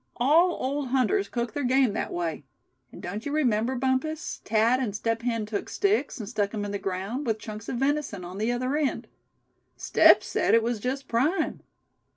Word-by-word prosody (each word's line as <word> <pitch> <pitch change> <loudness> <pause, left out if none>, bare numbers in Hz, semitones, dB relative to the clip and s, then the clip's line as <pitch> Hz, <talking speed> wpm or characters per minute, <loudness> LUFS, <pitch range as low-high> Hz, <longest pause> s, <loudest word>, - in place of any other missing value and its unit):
All 325 +8 +4
old 280 0 -2
hunters 270 +11 +1
cook 235 -2 -3
their 290 - -2
game 255 -3 +3
that - - -3
way. 165 -3 -3 0.5
And - - -12
don't 200 +5 -5
you 285 - -4
remember, 250 -4 +1
Bumpus, 265 +5 -1
Thad 225 +4 +3
and 225 -6 -2
Step 225 +2 -1
Hen 230 -3 -1
took 210 -1 -4
sticks, 400 -7 0
and 215 - -5
stuck 205 -2 -1
'em 205 -1 -2
in 205 - -4
the 200 - -3
ground, 195 +9 -3
with 220 -1 +1
chunks 215 0 -8
of - - -2
venison 270 -8 -1
on 180 +3 -7
the 220 +3 +1
other 255 +3 -1
end. 300 -3 -1 0.7
Step - - +5
said - - +2
it 230 - +4
was 235 -1 -1
just 265 +4 -3
prime. 285 +11 0
240 Hz, 190 wpm, -26 LUFS, 215-275 Hz, 0.7 s, Step